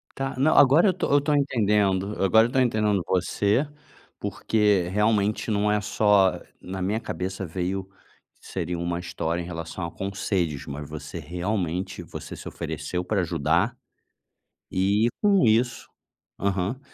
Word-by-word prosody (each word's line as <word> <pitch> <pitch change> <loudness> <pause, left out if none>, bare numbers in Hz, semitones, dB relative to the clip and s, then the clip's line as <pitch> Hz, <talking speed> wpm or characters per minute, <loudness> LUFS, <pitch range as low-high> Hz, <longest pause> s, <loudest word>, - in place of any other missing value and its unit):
Tá, 135 -1 -3
não 145 +4 +3
agora 145 +7 +7
eu - - +5
estou 180 - -2
eu 145 - +6
estou 145 +1 +1
entendendo, 105 -7 +2
agora 110 +4 +5
eu - - +1
estou 130 +2 +1
entendendo 105 -5 +2
você, 100 - +1 0.5
porque 105 -5 +1
realmente 105 +1 +1
não 105 0 +2
é 105 - +2
só 100 -3 +3 0.2
na 95 +1 -6
minha 100 +4 0
cabeça 95 -3 -4
veio, 95 +3 -3 0.5
seria 90 0 -4
uma 85 0 -2
história 85 -1 -3
em - - -6
relação 85 +1 -5
a 85 - -6
conselhos, 95 -7 -2
mas 75 0 -7
você 75 +2 -7
realmente, 90 +2 -3
você - - -8
se - - -9
ofereceu 90 0 -4
para 100 +2 0
ajudar, 85 - 0 0.9
e 100 +4 +2
com 200 -4 +4
isso 120 +3 +1 0.5
aham, 100 +5 -1
100 Hz, 145 wpm, -25 LUFS, 90-110 Hz, 0.9 s, agora